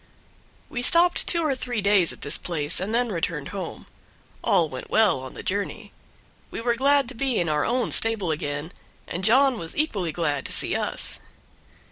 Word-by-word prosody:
We 245 Hz, -, -4 dB
stopped 340 Hz, +7 st, +4 dB
two 335 Hz, -2 st, +2 dB
or 290 Hz, -, +2 dB
three 250 Hz, -3 st, -3 dB
days 200 Hz, -4 st, +3 dB
at -, -, -11 dB
this 145 Hz, -, 0 dB
place 150 Hz, -4 st, -1 dB
and 190 Hz, +4 st, -3 dB
then 235 Hz, 0 st, +1 dB
returned 165 Hz, -5 st, -2 dB
home. 195 Hz, -2 st, -6 dB, 0.6 s
All -, -, +3 dB
went -, -, -8 dB
well 215 Hz, -10 st, +3 dB
on 130 Hz, 0 st, -9 dB
the -, -, -7 dB
journey; 200 Hz, +1 st, -3 dB, 0.6 s
we -, -, -6 dB
were 235 Hz, +1 st, +1 dB
glad 280 Hz, +1 st, +3 dB
to -, -, -8 dB
be 255 Hz, 0 st, -1 dB
in 170 Hz, -, 0 dB
our 150 Hz, -1 st, +1 dB
own 245 Hz, 0 st, 0 dB
stable 220 Hz, -7 st, +1 dB
again, 145 Hz, +1 st, -3 dB, 0.4 s
and 175 Hz, -, -4 dB
John 255 Hz, +3 st, +4 dB
was 165 Hz, -, -7 dB
equally 200 Hz, -, 0 dB
glad 150 Hz, -5 st, -1 dB
to -, -, -6 dB
see -, -, +1 dB
us. -, -, -2 dB
205 Hz, 185 wpm, -25 LUFS, 165-250 Hz, 0.6 s, stopped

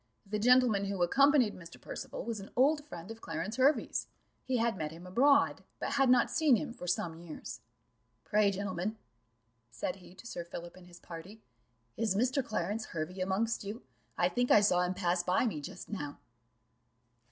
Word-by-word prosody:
The 210 Hz, +1 st, -2 dB
gentleman 240 Hz, -3 st, +5 dB
who 195 Hz, -2 st, 0 dB
accompanied 275 Hz, -, +4 dB
Mr. 170 Hz, -2 st, -12 dB
Percival -, -, -6 dB
was 230 Hz, -2 st, -3 dB
an 195 Hz, -, -9 dB
old 290 Hz, +4 st, +4 dB
friend 175 Hz, -, -8 dB
of 225 Hz, 0 st, -10 dB
Clarence 215 Hz, +3 st, -4 dB
Hervey's; 275 Hz, +3 st, +2 dB, 0.4 s
he 260 Hz, -1 st, 0 dB
had 230 Hz, -1 st, +1 dB
met 155 Hz, -4 st, -3 dB
him 170 Hz, +3 st, -11 dB
abroad, 280 Hz, +9 st, +3 dB, 0.2 s
but -, -, -2 dB
had 270 Hz, -2 st, +3 dB
not 250 Hz, -, +5 dB
seen 300 Hz, -4 st, +4 dB
him 240 Hz, 0 st, -3 dB
for 180 Hz, -7 st, -8 dB
some 170 Hz, -2 st, -1 dB
years. 170 Hz, -2 st, -8 dB, 0.6 s
"Pray, 210 Hz, -1 st, +3 dB
gentlemen," 195 Hz, +1 st, -3 dB, 0.7 s
said 180 Hz, +9 st, -4 dB
he 185 Hz, -1 st, -15 dB
to 210 Hz, -, -14 dB
Sir 175 Hz, -7 st, -5 dB
Philip 170 Hz, 0 st, -8 dB
and 185 Hz, -1 st, -15 dB
his 175 Hz, 0 st, -14 dB
party, 180 Hz, +6 st, -10 dB, 0.5 s
"is 215 Hz, -4 st, +1 dB
Mr. 255 Hz, +5 st, +2 dB
Clarence 215 Hz, 0 st, -2 dB
Hervey 170 Hz, +3 st, -5 dB
amongst 200 Hz, +6 st, 0 dB
you? 210 Hz, +5 st, -6 dB, 0.3 s
I -, -, +4 dB
think 245 Hz, 0 st, 0 dB
I 210 Hz, -, +7 dB
saw 180 Hz, -3 st, +4 dB
him 180 Hz, +1 st, 0 dB
pass 175 Hz, 0 st, +1 dB
by 180 Hz, +7 st, +2 dB
me 160 Hz, -11 st, -2 dB
just -, -, -8 dB
now." 145 Hz, -9 st, -5 dB
205 Hz, 180 wpm, -32 LUFS, 180-240 Hz, 0.7 s, I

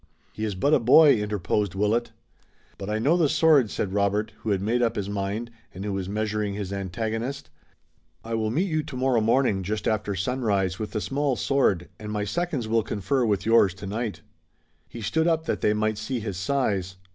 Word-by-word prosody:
"He 110 Hz, -, -3 dB
is 105 Hz, -3 st, -3 dB
but 140 Hz, +11 st, +2 dB
a -, -, +5 dB
boy," 140 Hz, +4 st, +7 dB
interposed 105 Hz, -2 st, -1 dB
Willet. 105 Hz, +4 st, +1 dB, 0.7 s
"But 100 Hz, 0 st, -5 dB
I 105 Hz, -, 0 dB
know 140 Hz, +10 st, +3 dB
the 160 Hz, -5 st, +3 dB
sword," 150 Hz, -9 st, +4 dB
said 95 Hz, -2 st, -3 dB
Robert, 105 Hz, +2 st, 0 dB
who 110 Hz, -, -4 dB
had 100 Hz, -2 st, +2 dB
made 115 Hz, +5 st, 0 dB
up 115 Hz, -1 st, +1 dB
his 100 Hz, -2 st, -3 dB
mind, 100 Hz, +4 st, -3 dB, 0.2 s
and 95 Hz, +2 st, -6 dB
who 105 Hz, -, -2 dB
was 95 Hz, -1 st, -3 dB
measuring 105 Hz, -1 st, -2 dB
his 100 Hz, -2 st, -4 dB
antagonist. 110 Hz, +7 st, -4 dB, 0.7 s
"I 115 Hz, -, -5 dB
will 110 Hz, -1 st, 0 dB
meet 170 Hz, -, 0 dB
you 155 Hz, -3 st, 0 dB
tomorrow 130 Hz, -5 st, 0 dB
morning 115 Hz, -3 st, +2 dB
just 105 Hz, +3 st, -3 dB
after 105 Hz, -2 st, 0 dB
sunrise 100 Hz, -3 st, 0 dB
with 110 Hz, -, -5 dB
the 110 Hz, -, -1 dB
small 140 Hz, +1 st, 0 dB
sword, 110 Hz, -11 st, +1 dB
and 105 Hz, -1 st, -6 dB
my 105 Hz, -1 st, -1 dB
seconds 150 Hz, -, -2 dB
will 115 Hz, +1 st, +2 dB
confer 110 Hz, +5 st, -1 dB
with 105 Hz, -3 st, 0 dB
yours 110 Hz, -5 st, +4 dB
tonight." 105 Hz, +3 st, -4 dB, 0.7 s
He 115 Hz, -, -8 dB
stood 160 Hz, +9 st, +1 dB
up 160 Hz, -1 st, +1 dB
that -, -, -2 dB
they 105 Hz, -, +3 dB
might 110 Hz, 0 st, 0 dB
see 120 Hz, +3 st, -3 dB
his 105 Hz, -3 st, -4 dB
size. 95 Hz, -3 st, -1 dB
110 Hz, 195 wpm, -25 LUFS, 100-125 Hz, 0.7 s, boy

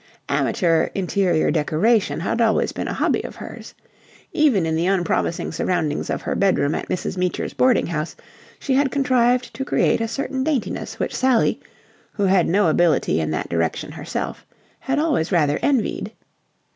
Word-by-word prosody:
Amateur 165 Hz, -3 st, +1 dB
interior 185 Hz, -3 st, +1 dB
decoration 165 Hz, +6 st, +1 dB
had 210 Hz, +6 st, -1 dB
always 225 Hz, -1 st, +2 dB
been -, -, -4 dB
a -, -, -2 dB
hobby -, -, 0 dB
of -, -, -8 dB
hers. -, -, -10 dB, 0.6 s
Even 255 Hz, -, +3 dB
in 160 Hz, 0 st, 0 dB
the 165 Hz, +2 st, 0 dB
unpromising 175 Hz, -2 st, 0 dB
surroundings 160 Hz, -4 st, -1 dB
of -, -, -3 dB
her -, -, -2 dB
bedroom 180 Hz, -7 st, +2 dB
at -, -, -4 dB
Mrs. 185 Hz, -, -3 dB
Meecher's 180 Hz, -1 st, -2 dB
boarding 255 Hz, -4 st, +3 dB
house 160 Hz, -1 st, -3 dB, 0.4 s
she 275 Hz, -, -2 dB
had 275 Hz, +1 st, +3 dB
contrived 250 Hz, -2 st, +1 dB
to 270 Hz, -, -4 dB
create 265 Hz, -, +1 dB
a 225 Hz, -, 0 dB
certain 265 Hz, +2 st, -3 dB
daintiness 280 Hz, -5 st, -2 dB
which -, -, -3 dB
Sally, 255 Hz, -3 st, +2 dB, 0.5 s
who 205 Hz, -, -2 dB
had 190 Hz, -2 st, +3 dB
no 200 Hz, +2 st, +3 dB
ability 160 Hz, -, +2 dB
in 80 Hz, -, -2 dB
that 80 Hz, -, -3 dB
direction 85 Hz, -1 st, -1 dB
herself, -, -, -5 dB, 0.4 s
had 270 Hz, +2 st, -2 dB
always 295 Hz, -, 0 dB
rather 150 Hz, -5 st, +2 dB
envied. 270 Hz, -6 st, 0 dB
195 Hz, 160 wpm, -21 LUFS, 165-250 Hz, 0.6 s, Even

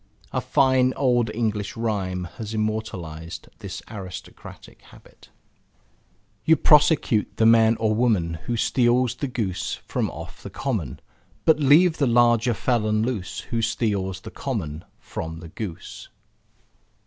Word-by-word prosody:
A -, -, -1 dB
fine 130 Hz, -1 st, +3 dB
old 120 Hz, -4 st, +2 dB
English 110 Hz, -3 st, -2 dB
rhyme 100 Hz, -5 st, -2 dB, 0.2 s
has 110 Hz, 0 st, -5 dB
immortalized 90 Hz, -7 st, -4 dB
this 95 Hz, -1 st, -7 dB
easy -, -, -10 dB
aristocratic 95 Hz, -3 st, -10 dB
habit -, -, -19 dB, 1.1 s
You 160 Hz, -, +5 dB
prosecute 150 Hz, -7 st, +3 dB
the 110 Hz, -, +3 dB
man 115 Hz, 0 st, +5 dB
or 110 Hz, -1 st, +1 dB
woman 100 Hz, -9 st, +1 dB
Who 120 Hz, -, -1 dB
steals 120 Hz, +1 st, +2 dB
the 140 Hz, +3 st, -4 dB
goose 110 Hz, -8 st, -2 dB
from -, -, -1 dB
off -, -, -9 dB
the -, -, -8 dB
common, 105 Hz, -, -3 dB, 0.4 s
But 160 Hz, -1 st, +5 dB
leave 155 Hz, +4 st, +5 dB
the 140 Hz, -, +3 dB
larger 120 Hz, 0 st, +4 dB
felon 110 Hz, -3 st, +1 dB
loose 110 Hz, -6 st, -3 dB
Who 115 Hz, -1 st, 0 dB
steals 100 Hz, -4 st, -1 dB
the -, -, -9 dB
common 75 Hz, +3 st, -4 dB
from 80 Hz, -8 st, -6 dB
the 85 Hz, -1 st, -10 dB
goose. 95 Hz, -2 st, -7 dB
110 Hz, 135 wpm, -24 LUFS, 95-125 Hz, 1.1 s, You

